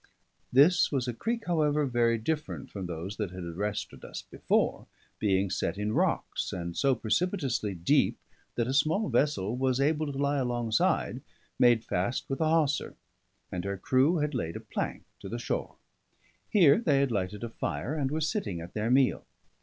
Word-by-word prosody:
This 150 +8 +5
was 130 -4 0
a 120 - -1
creek, 230 - -2
however, 150 -4 +2
very 120 -2 +2
different 150 +7 -3
from 95 -3 -5
those 85 +4 -5
that 105 -4 -2
had 90 0 -7
arrested 100 +5 -4
us - - -7
before; - - 0 0.3
being 95 -2 +1
set - - -1
in 105 +1 -1
rocks, - - 0
and 85 -1 -4
so 135 -2 +3
precipitously 120 - -1
deep 85 0 +2 0.4
that 120 - +1
a 130 - -2
small 160 +9 +2
vessel 120 -7 +1
was 130 0 +1
able 150 +1 +1
to 135 - -6
lie 140 0 +1
alongside, 120 -3 0 0.4
made 120 -2 +5
fast 100 +6 -2
with 135 - -2
a 155 - +3
hawser; 155 -3 +1 0.6
and 90 -1 -3
her 100 0 -3
crew 135 - +3
had 150 -1 -1
laid 85 -10 -3
a - - -4
plank - - -4 0.2
to 95 +1 -8
the 120 - -3
shore. 120 - -3 0.7
Here 175 -6 +6
they 150 -12 +2
had 140 -2 +1
lighted 100 0 -2
a 115 - -3
fire, 120 +4 -3
and 145 -4 -1
were 155 +3 -2
sitting 155 - -1
at 85 +1 -9
their 110 +1 -1
meal. 130 0 +3
125 Hz, 175 wpm, -29 LUFS, 105-150 Hz, 0.7 s, Here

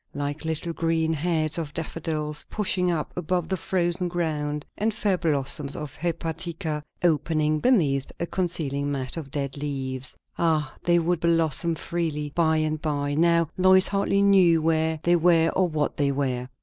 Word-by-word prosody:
Like 145 +2 -3
little 160 +1 -3
green 165 -1 0
heads 160 0 0
of 155 -2 -6
daffodils 155 -2 -3
pushing 185 -3 0
up 165 -3 -2
above 180 0 -1
the 190 - +1
frozen 180 0 -1
ground, 150 -4 -2
and 215 +1 -1
fair 205 -3 +1
blossoms 145 -4 0
of 150 -2 -6
hepatica 165 -1 -3 0.2
opening 155 -1 +1
beneath 150 - +2
a 170 - 0
concealing 150 -6 -2
mat 130 -2 -2
of 160 -5 -6
dead 140 0 -4
leaves. 135 -3 -4 0.2
Ah, 155 -4 +1
they 175 0 +3
would 170 0 +1
blossom 165 0 +2
freely 155 -4 -3
by 160 -2 +2
and 155 0 -1
by; 145 -2 -1
now 170 +1 +3
Lois 185 0 +5
hardly 200 0 +1
knew 185 -4 +5
where 160 0 +1
they 175 0 +4
were 165 -1 +4
or 185 0 +1
what 150 -2 -1
they 140 -1 +2
were. 130 -3 -2
160 Hz, 160 wpm, -25 LUFS, 150-175 Hz, 0.2 s, Lois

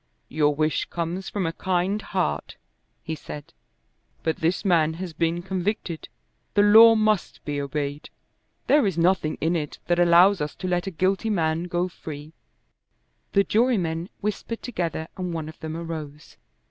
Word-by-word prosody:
"Your 150 -1 +2
wish 155 +1 +1
comes 175 +3 -4
from 200 -3 -2
a 165 - -1
kind 185 +4 0
heart," 75 - -2 0.5
he 160 - -4
said. 150 -1 -9 0.7
"But 160 -1 0
this 170 +6 0
man 160 -4 +3
has 175 -1 -6
been 170 +2 -1
convicted. 185 -2 -3 0.5
The 205 - +5
law 225 +2 +9
must 215 -3 0
be 145 -1 -2
obeyed. 145 +1 -4 0.6
There 290 -7 +4
is 185 -4 -2
nothing 170 -2 +2
in 165 +2 +1
it 150 -3 -3
that 175 0 +1
allows 175 +2 +6
us 150 0 -3
to 185 - -5
let 180 +1 0
a - - +1
guilty 190 +5 0
man 165 -4 0
go 175 0 -1
free." 155 -3 -9 1.0
The 200 - +5
jurymen 190 -6 +1
whispered 210 +2 -3
together 170 -8 -3
and 180 -2 -3
one 160 -2 -4
of 155 - -11
them 160 0 -5
arose. 155 -3 -7
170 Hz, 160 wpm, -25 LUFS, 160-190 Hz, 1.0 s, law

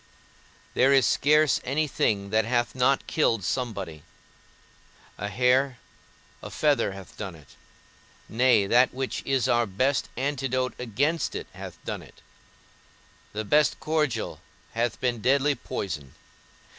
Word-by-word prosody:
There 135 +2 +4
is 135 -3 +5
scarce 150 +3 +3
any 150 +4 0
thing 100 -7 0
that 110 +1 +3
hath 120 +2 0
not 130 +2 +2
killed 115 - +1
somebody; 105 - -3 1.2
a 100 - -2
hair, 125 +3 +2 0.6
a - - -7
feather 145 -9 +1
hath 95 -2 -11
done 95 -5 -6
it; 75 -4 -17 0.8
nay, 120 -3 +3
that 125 +5 +3
which 130 0 -3
is 135 -2 +1
our 120 -1 +2
best 130 +9 0
antidote 130 -2 -1
against 140 +8 -1
it - - -4
hath - - -9
done - - -4
it; - - -17 1.1
the 110 +1 -4
best 150 +7 +3
cordial 150 -8 -1 0.3
hath 120 +1 -1
been 120 -3 -1
deadly 140 +4 +3
poison. 95 - -5
125 Hz, 130 wpm, -26 LUFS, 110-135 Hz, 1.2 s, is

